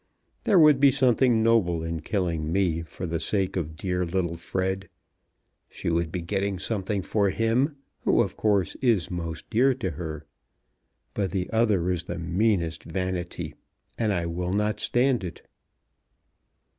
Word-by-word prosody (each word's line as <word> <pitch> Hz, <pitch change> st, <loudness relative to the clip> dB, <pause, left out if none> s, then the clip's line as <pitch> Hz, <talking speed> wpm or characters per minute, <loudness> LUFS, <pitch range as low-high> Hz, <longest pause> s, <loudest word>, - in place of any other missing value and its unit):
There 195 Hz, -, +4 dB
would 150 Hz, -4 st, +7 dB
be 140 Hz, 0 st, +7 dB
something 125 Hz, -3 st, +3 dB
noble 95 Hz, -8 st, +3 dB
in 80 Hz, 0 st, -3 dB
killing 85 Hz, -3 st, -1 dB
me 85 Hz, -3 st, +1 dB
for 85 Hz, +3 st, -7 dB
the 85 Hz, -1 st, -2 dB
sake 95 Hz, 0 st, 0 dB
of 80 Hz, -4 st, -3 dB
dear 90 Hz, +1 st, -1 dB
little 85 Hz, -1 st, -1 dB
Fred. 95 Hz, +2 st, -3 dB, 0.8 s
She -, -, -3 dB
would 85 Hz, -1 st, 0 dB
be 90 Hz, -1 st, -3 dB
getting 100 Hz, +2 st, -1 dB
something 100 Hz, 0 st, -2 dB
for 100 Hz, 0 st, +1 dB
him 115 Hz, +8 st, +1 dB, 0.2 s
who, -, -, +3 dB
of -, -, -5 dB
course, 100 Hz, -4 st, +1 dB
is 110 Hz, -, +2 dB
most 85 Hz, -2 st, -5 dB
dear 130 Hz, +4 st, +4 dB
to 110 Hz, -9 st, -3 dB
her. 80 Hz, 0 st, -6 dB, 0.9 s
But 100 Hz, -2 st, -1 dB
the 90 Hz, 0 st, -3 dB
other 105 Hz, -6 st, +2 dB
is 85 Hz, -1 st, -2 dB
the 85 Hz, -, -5 dB
meanest 85 Hz, -1 st, 0 dB
vanity; 90 Hz, 0 st, -3 dB, 0.4 s
and 110 Hz, -2 st, 0 dB
I 85 Hz, -4 st, 0 dB
will 90 Hz, +2 st, -2 dB
not 105 Hz, +1 st, 0 dB
stand 125 Hz, -2 st, +2 dB
it." 90 Hz, -, -7 dB
95 Hz, 155 wpm, -26 LUFS, 85-110 Hz, 0.9 s, would